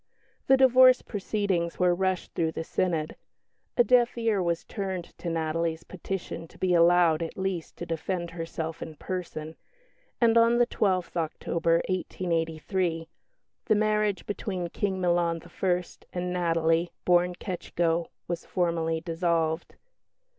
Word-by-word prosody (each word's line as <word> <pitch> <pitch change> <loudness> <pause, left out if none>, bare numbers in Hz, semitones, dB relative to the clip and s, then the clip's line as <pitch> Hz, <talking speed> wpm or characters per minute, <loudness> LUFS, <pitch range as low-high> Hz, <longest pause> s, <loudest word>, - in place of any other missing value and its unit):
The 265 - +6
divorce 255 -1 +6
proceedings 195 -5 -1
were 180 -1 +3
rushed 185 0 -1
through 160 -1 0
the 160 - -3
Synod. 160 -2 -1 0.6
A 240 - +7
deaf 240 -1 +3
ear 225 -4 +1
was 170 -1 -1
turned 190 -4 -5
to 175 - -3
Natalie's 165 0 -1
petition 185 -2 -6
to - - -19
be 185 -1 +1
allowed, 170 -1 +5
at 165 - -5
least, 190 -3 -3
to 175 - -5
defend 170 +1 -3
herself 165 -1 -5
in 160 - -7
person; 160 -2 -5 0.6
and 230 -1 +5
on 230 +1 +4
the 240 - +5
12th 185 -6 0
October, 165 0 0
1888, 170 -1 -1 0.6
the 215 - +3
"marriage 210 -1 +1
between 185 -4 -3
King 190 +1 -2
Milan 175 -2 +1 0.2
I. 180 -1 +2 0.3
and 180 0 -2
Natalie, 165 -1 +1 0.2
born 180 0 +3
Ketschko," 170 -2 -1 0.2
was 170 -1 -3
formally 165 -2 -1
dissolved. 165 -1 -1
175 Hz, 130 wpm, -27 LUFS, 165-190 Hz, 0.6 s, A